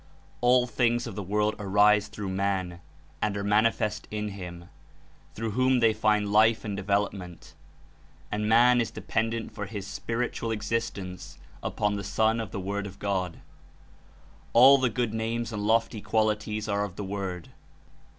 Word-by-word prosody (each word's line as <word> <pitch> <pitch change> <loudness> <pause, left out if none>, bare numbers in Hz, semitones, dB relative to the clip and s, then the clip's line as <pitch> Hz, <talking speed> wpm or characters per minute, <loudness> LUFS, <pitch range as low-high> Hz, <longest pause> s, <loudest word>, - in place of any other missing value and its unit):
''All 125 0 +4
things 120 -1 +1
of 115 - -6
the 105 - -5
world 105 +3 0
arise 105 +1 +4
through 100 -2 -6
man 95 -2 -2 0.4
and 105 -1 0
are 100 - -3
manifest 105 +1 +1
in 105 0 -3
him, 90 -3 -8 0.7
through 110 0 -3
whom 130 +3 +2
they 115 -2 +4
find 105 -1 +1
life 110 +1 +4
and 105 -2 -3
development; 100 -3 -3 0.8
and 105 0 -1
man 120 +2 +6
is 115 - -2
dependent 115 0 -2
for 105 -2 -5
his 100 -1 -6
(Spirit 115 +4 -3
ual) 115 - -3
existence 105 -4 -4 0.2
upon 105 0 -1
the 100 - -5
Sun 110 +3 +1
of 110 -4 -4
the - - -5
JFord 100 +2 -3
of 95 -1 -11
God. 95 -4 -2 1.1
All 135 +4 +8
the 130 -1 +2
good 120 -1 -2
names 115 +1 -2
and 105 - -3
lofty 115 -1 +1
qualities 110 0 0
are 100 -1 0
of 95 -4 -6
the 105 - -5
Word. 95 -3 -5
105 Hz, 160 wpm, -27 LUFS, 100-115 Hz, 1.1 s, All